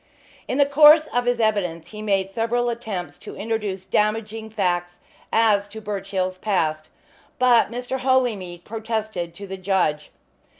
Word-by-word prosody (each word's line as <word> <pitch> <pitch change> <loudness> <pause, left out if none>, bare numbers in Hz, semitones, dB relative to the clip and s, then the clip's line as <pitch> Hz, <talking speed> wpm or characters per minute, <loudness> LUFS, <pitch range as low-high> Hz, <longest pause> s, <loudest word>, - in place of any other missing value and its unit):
In 255 - -2
the 285 - +5
course 300 +2 +7
of 245 0 +1
his 245 -1 +1
evidence 195 -7 0
he 210 -1 -8
made 195 -2 0
several 235 +3 0
attempts 220 -7 -5
to - - -9
introduce 205 -4 -3
damaging 220 +1 -1
facts 175 -4 -1 0.3
as 210 -3 +3
to 215 +2 -9
Birchill's 195 -3 -3
past, 155 -7 -1 0.5
but 250 -3 +4
Mr. 245 +2 -4
Holymead 230 -10 0
protested 220 -6 -4
to 200 - -8
the 190 0 -6
judge. 185 -6 0
210 Hz, 140 wpm, -23 LUFS, 185-235 Hz, 0.5 s, course